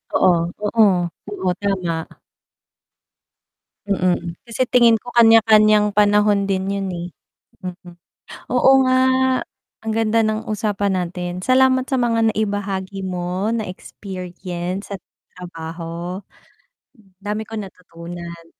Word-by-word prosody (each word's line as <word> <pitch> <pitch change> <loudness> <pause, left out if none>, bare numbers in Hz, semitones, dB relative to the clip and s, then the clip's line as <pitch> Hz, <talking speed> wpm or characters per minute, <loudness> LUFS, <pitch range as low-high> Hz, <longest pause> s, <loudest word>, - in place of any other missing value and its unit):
Oo, 185 -1 +5 0.3
oo. 220 +1 +4 0.5
Oo. 190 -2 -2
tama. 180 -5 -2 1.8
Mm, 180 -3 0
kasi 235 +2 -4
tingin 235 -2 +5
ko 245 - -9
kanya-kanyang 215 -2 +6
panahon 205 -1 +4
din 190 -1 -1
yun 195 -1 -2
eh, 175 +1 -5 0.6
mm. 180 -1 -8 0.6
Oo 250 +1 +5 0.2
nga, 255 0 +3 0.9
ang 220 - -1
ganda 225 0 +2
ng 215 0 -2
usapan 205 -2 -1
natin, 180 +1 -5
salamat 260 0 +4
sa 265 -3 0
mga 230 -2 +2
naibahagi 200 -2 -3
mo 185 +3 -2
na 220 -4 -2
experience 180 0 -6
sa - - -2 0.4
trabaho, 170 +1 -7 1.0
dami 210 +1 -3
kong 220 -1 -5
natutunan. 170 -1 -10
200 Hz, 105 wpm, -20 LUFS, 180-220 Hz, 1.8 s, kanya-kanyang